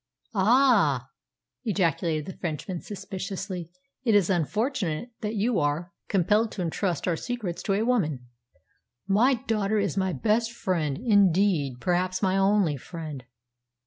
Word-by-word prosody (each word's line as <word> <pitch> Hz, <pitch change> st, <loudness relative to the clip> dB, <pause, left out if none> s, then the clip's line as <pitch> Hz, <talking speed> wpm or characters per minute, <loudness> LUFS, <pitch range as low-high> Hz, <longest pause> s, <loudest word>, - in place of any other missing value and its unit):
"Ah!" 200 Hz, -, +3 dB, 0.5 s
ejaculated 165 Hz, -6 st, 0 dB
the 190 Hz, -, -6 dB
Frenchman 170 Hz, +1 st, -4 dB
suspiciously. 190 Hz, -3 st, -5 dB, 0.3 s
"It 225 Hz, -5 st, +3 dB
is 195 Hz, -2 st, +4 dB
unfortunate 210 Hz, -, -1 dB
that 215 Hz, +1 st, -2 dB
you 215 Hz, 0 st, +1 dB
are 150 Hz, +4 st, -1 dB
compelled 210 Hz, +4 st, +2 dB
to 190 Hz, -, -3 dB
entrust 170 Hz, 0 st, -1 dB
our 175 Hz, -, +2 dB
secrets 215 Hz, -3 st, -4 dB
to 195 Hz, -, 0 dB
a 205 Hz, +3 st, +1 dB
woman." 155 Hz, -, 0 dB, 0.8 s
"My 230 Hz, +7 st, +4 dB
daughter 215 Hz, -2 st, -1 dB
is 200 Hz, -1 st, 0 dB
my 190 Hz, -1 st, +1 dB
best 225 Hz, +4 st, +1 dB
friend; 165 Hz, -10 st, -1 dB
indeed, 195 Hz, -, +3 dB
perhaps 180 Hz, +4 st, 0 dB
my 190 Hz, 0 st, +2 dB
only 195 Hz, -6 st, +3 dB
friend." 150 Hz, -3 st, -7 dB
190 Hz, 130 wpm, -26 LUFS, 165-215 Hz, 0.8 s, is